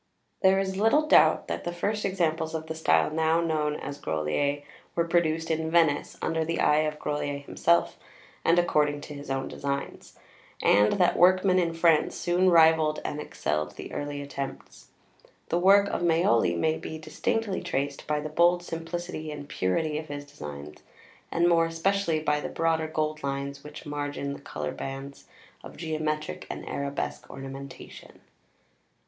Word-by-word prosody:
] - - -46
There 190 0 +5
is 190 -1 -1
little 225 +9 +3
doubt - - +5
that - - -3
the 175 - -3
first 205 +5 -2
examples 165 -4 0
of 160 0 -4
the 160 - -4
style 160 -1 +2
now 160 +1 +2
known 155 -3 0
as 145 -1 -6
"Grolier" 140 - -1 0.3
were 170 0 +1
produced 165 -1 +1
in 160 0 -1
Venice, 160 -3 +2
under 160 0 0
the 165 +1 -2
eye 150 - +4
of 155 0 -1
Grolier 145 -1 -2
himself, 170 +4 +1 0.4
and 170 - +4
according 150 -4 +2
to 150 - -8
his 145 -1 -9
own 135 0 -1
designs; 140 0 -5 0.4
and 105 +1 +4
that 180 -3 +3
workmen 185 +1 +5
in 165 -2 0
France, 165 -2 +3
soon 180 +2 +2
rivalled 160 -2 +5
and 150 - -3
excelled 75 - -3
the - - -8
early 145 0 -4
attempts. 140 -1 -7 0.6
The 170 - +1
work 200 +2 +6
of - - -2
Maioli 160 - +3
may 155 - +1
be 160 - -6
distinctly 190 +6 -2
traced 140 +1 -3
by 150 0 0
the 155 - -4
bold 175 +3 +3
simplicity 165 -1 -5
and 145 -1 -7
purity 150 - -1
of 155 - -8
his 145 -1 -6
designs; 75 - -9 0.5
and 170 +1 +3
more 165 -1 +4
especially 165 0 0
by 150 -1 +1
the - - -4
broader 165 -1 0
gold 155 0 -2
lines 140 0 -4
which 150 - -10
margin 145 -1 -3
the - - -10
coloured 75 - -5
bands 135 +1 -7 0.4
of - - -11
geometric 155 -1 -3
and - - -6
arabesque 140 0 -4
ornamentation. 135 0 -10
155 Hz, 165 wpm, -27 LUFS, 145-170 Hz, 0.6 s, work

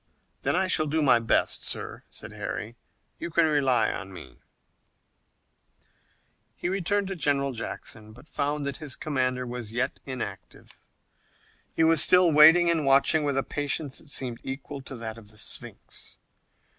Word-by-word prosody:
"Then - - 0
I 190 +1 +2
shall 155 -4 +1
do 155 +1 0
my 125 -4 +5
best, 115 - 0
sir," - - -4
said - - -10
Harry. 115 +2 -6 0.4
"You 170 - -5
can 170 0 +3
rely 135 -7 +2
upon 95 - -6
me" 75 -9 -12 2.2
He - - -3
returned 195 +2 -1
to 195 - -4
General 140 -4 0
Jackson, 110 -2 -8
but 125 +7 -16
found 145 -1 -2
that 140 -1 -3
his 150 -5 -6
commander 130 -4 -1
was 120 -3 -6
yet 120 +3 -2
inactive. 130 -2 -7 1.0
He - - +2
was 160 -2 +5
still 180 -2 +6
waiting 160 +3 +7
and 165 -2 +2
watching 140 +3 +4
with 140 -2 -1
a 135 - +1
patience 145 -1 -1
that 155 - -13
seemed 125 -4 0
equal 135 +1 -7
to 130 - -8
that 115 -1 -6
of 105 -2 -17
the 110 - -16
Sphinx. 110 - -6
140 Hz, 155 wpm, -26 LUFS, 125-155 Hz, 2.2 s, waiting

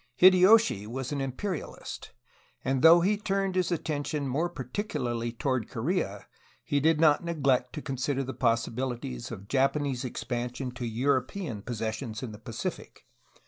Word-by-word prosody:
Hideyoshi 185 - +6
was 130 +3 -4
an 140 -1 -1
imperialist, 145 +7 -5 0.5
and 135 0 +1
though 165 +2 +8
he 205 +4 +2
turned 195 -2 -1
his 185 -1 +1
attention 150 -3 -2
more 155 +7 0
particularly 125 - -3
toward 125 -1 -1
Korea 115 - -2 0.4
did 150 +2 +3
not 155 0 +5
neglect 135 -7 +1
to 150 - -6
consider 135 0 -1
the 130 0 -5
possibilities 115 - -1
of 100 +1 -8
Japanese 135 0 +1
expansion 125 +1 -3
to 125 -1 -5
European 130 - -1
possessions 110 +1 -4
in 120 - -5
the 105 - -10
Pacific. 115 0 -6
135 Hz, 135 wpm, -28 LUFS, 120-160 Hz, 0.5 s, though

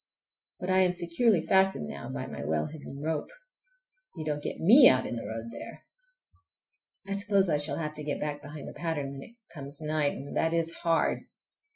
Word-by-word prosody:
But 185 +1 -2
I 185 - +4
am 180 -1 +4
securely 175 +2 +1
fastened 190 - +3
now 70 -3 -7
by 65 0 -4
my 65 - -7
well 75 +1 0
hidden 145 -2 -8
rope—you - - -8
don't 150 -1 -2
get - - -5
me 240 - +9
out 130 0 +2
in - - -4
the 115 - -5
road 115 +1 -6
there! - - -9 1.2
I - - -6
suppose 200 -1 +3
I 150 - +2
shall 145 -1 +2
have 155 -2 -3
to 155 0 -4
get 145 -1 -2
back 145 -1 -3
behind 150 -1 -9
the - - -8
pattern 155 -5 -3
when 135 -1 -8
it 230 - -13 0.2
comes 140 -2 -3
night, 155 -2 0
and 140 +1 -8
that 165 0 +1
is 165 0 0
hard! 165 -1 +1
155 Hz, 195 wpm, -29 LUFS, 140-190 Hz, 1.2 s, me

